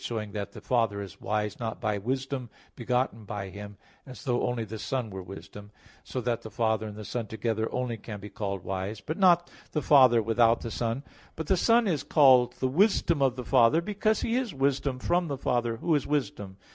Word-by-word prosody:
vi, - - -8
2), 120 - -3
showing 105 -2 -4
that 100 -1 -5
the - - -10
Father 115 -5 +1
is 95 - -12
wise, 105 -1 -2
not 115 -1 -4
by 105 -3 -1
Wisdom 130 +2 -3 0.3
begotten 125 -2 -1
by 100 -1 -5
Him, 100 +1 -9 0.3
as 130 -4 -11
though 125 -4 0
only 120 -2 -1
the 110 0 -7
Son 125 -3 -3
were 95 0 -6
Wisdom; 95 +3 -10 0.3
so 130 - -4
that 120 -1 -1
the 110 - -8
Father 110 -1 0
and 105 - -8
the 105 0 -8
Son 120 0 -3
together 110 +1 -2
only 125 -2 -2
can 105 -1 -8
be 100 - -8
called 100 -3 -4
wise, 95 +3 -4
but 155 - -4
not 175 -2 +4 0.2
the 150 - 0
Father 130 -5 +6
without 115 +1 +3
the 115 - -5
Son. 115 +4 -2 0.3
But 160 - -4
the 190 - +3
Son 230 +5 +3
is 160 -7 0
called 130 -5 +5
the 130 - -1
Wisdom 170 0 +2
of 130 -2 +3
the 125 -2 -6
Father, 130 +5 +5
because 210 +4 0
He 230 - 0
is 240 - -2
Wisdom 135 -1 0
from 175 +6 0
the 140 -3 -3
Father 120 -3 0
Who 165 +7 0
is 145 - +1
Wisdom. 105 -9 -2
120 Hz, 220 wpm, -28 LUFS, 105-135 Hz, 0.3 s, Father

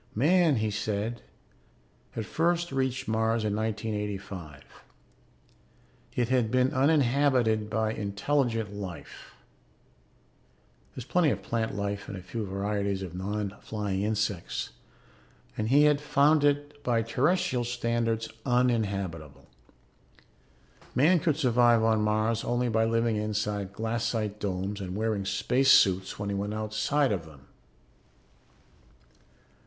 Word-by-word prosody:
Man, 160 - +4
he 110 -2 0
said, 110 +2 -3 0.9
had 110 - -4
first 170 +5 0
reached 130 0 -1
Mars 110 +1 +1
in 105 -1 0
1985. 105 -8 -4 1.5
It 120 -1 0
had 125 -4 +2
been 130 +3 +2
uninhabited 130 -6 +2
by 110 0 0
intelligent 110 +1 -1
life 95 -5 -9 1.5
(there - - -26
is - - -9
plenty 170 +2 +2
of - - -2
plant 115 -3 -2
life 100 0 -3
and 100 - -6
a 90 - -9
few 110 +2 -5
varieties 100 0 -2
of 90 -3 -7
non 100 +2 -3
flying 105 -3 -3
insects) 105 -3 -2 0.8
and 110 0 -2
he 145 +3 +6
had 150 -1 +4
found 145 +1 +3
it 145 0 0
by 120 -3 +1
terrestrial 140 +3 +1
standards 115 -2 -1 0.2
uninhabitable. 100 - -1 1.5
Man 165 +7 +5
could 150 -1 +1
survive 120 -5 +4
on 110 -1 +3
Mars 110 +2 +1
only 120 0 0
by 110 0 +2
living 115 -1 +1
inside 105 -2 -2
glassite 110 -1 -2
domes 100 +1 -3
and 95 -1 -5
wearing 110 -2 -1
space 130 +6 +1
suits 95 -5 +4
when 100 0 -4
he 100 - -1
went 100 +2 -3
outside 110 +6 0
of 90 -6 -3
them. 75 -4 -15
110 Hz, 120 wpm, -28 LUFS, 100-125 Hz, 1.5 s, he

